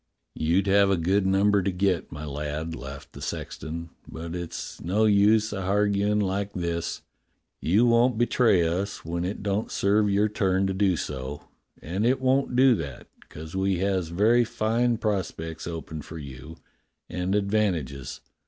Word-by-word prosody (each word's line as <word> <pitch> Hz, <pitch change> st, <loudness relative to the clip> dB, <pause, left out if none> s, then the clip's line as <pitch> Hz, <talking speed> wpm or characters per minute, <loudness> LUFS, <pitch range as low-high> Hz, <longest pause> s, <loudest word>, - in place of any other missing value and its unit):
You'd 85 Hz, +5 st, +1 dB
have 100 Hz, 0 st, +4 dB
a 95 Hz, -, +2 dB
good 95 Hz, +4 st, +1 dB
number 100 Hz, +1 st, +3 dB
to 95 Hz, -, 0 dB
get, 90 Hz, -1 st, 0 dB
my 75 Hz, 0 st, -6 dB
lad," 75 Hz, +3 st, -4 dB
laughed 70 Hz, 0 st, -9 dB
the -, -, -10 dB
sexton. 85 Hz, +1 st, -5 dB, 0.2 s
"But 80 Hz, +1 st, -7 dB
it's 85 Hz, -2 st, -6 dB
no 100 Hz, +6 st, +1 dB
use 105 Hz, +1 st, +4 dB
a 95 Hz, -, -3 dB
harguin' 100 Hz, +1 st, +1 dB
like 100 Hz, 0 st, -1 dB
this. 85 Hz, -2 st, -3 dB, 0.6 s
You 105 Hz, +9 st, +3 dB
won't 120 Hz, 0 st, +4 dB
betray 115 Hz, -6 st, +3 dB
us 95 Hz, +4 st, -3 dB
when 85 Hz, +1 st, -2 dB
it 95 Hz, +3 st, -4 dB
don't 100 Hz, +2 st, -1 dB
serve 105 Hz, +1 st, +2 dB
your 100 Hz, +2 st, +3 dB
turn 95 Hz, -2 st, +1 dB
to 95 Hz, -, 0 dB
do 95 Hz, -2 st, +2 dB
so, 70 Hz, 0 st, -5 dB, 0.3 s
and 90 Hz, +6 st, -2 dB
it 130 Hz, +3 st, +3 dB
won't 130 Hz, 0 st, +1 dB
do 130 Hz, 0 st, +6 dB
that, 70 Hz, -6 st, -7 dB, 0.2 s
'cos 80 Hz, +2 st, -9 dB
we 95 Hz, -1 st, +1 dB
has 95 Hz, -2 st, 0 dB
very 110 Hz, +8 st, +3 dB
fine 115 Hz, +2 st, 0 dB
pros 105 Hz, -5 st, 0 dB
pects 80 Hz, 0 st, -7 dB
open 80 Hz, -2 st, -6 dB
for 80 Hz, +3 st, -9 dB
you, 70 Hz, +2 st, -9 dB, 0.5 s
and 90 Hz, +2 st, -2 dB
advantages. 95 Hz, -11 st, -1 dB
95 Hz, 160 wpm, -26 LUFS, 85-105 Hz, 0.6 s, do